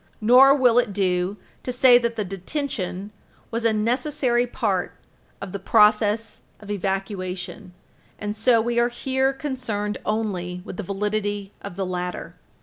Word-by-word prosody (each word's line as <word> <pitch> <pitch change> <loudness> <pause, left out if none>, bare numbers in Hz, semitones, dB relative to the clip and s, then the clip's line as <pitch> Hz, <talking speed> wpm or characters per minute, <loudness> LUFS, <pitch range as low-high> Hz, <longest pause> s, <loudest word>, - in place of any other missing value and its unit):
Nor 255 +5 +7
will 245 -4 +4
it 240 -5 -1
do 185 0 0 0.2
to 250 - -3
say 245 0 +6
that 235 -1 -2
the 210 - -2
detention 195 - -4 0.4
was 230 0 -2
a 230 - +4
necessary 245 +3 0
part 205 -7 -1 0.5
of 195 - -7
the 200 - -5
process 210 +2 +3 0.2
of 205 -1 -8
evacuation, 190 -2 -4 0.4
and 210 0 -4
so 230 +2 +3
we 235 +1 0
are 240 0 +3
here 265 +2 0
concerned 255 -7 -3
only 180 -5 -2
with - - -8
the - - -2
validity 205 +1 -2
of 200 -3 -8
the 195 0 -2
latter. 180 -2 -4
210 Hz, 145 wpm, -23 LUFS, 195-240 Hz, 0.5 s, Nor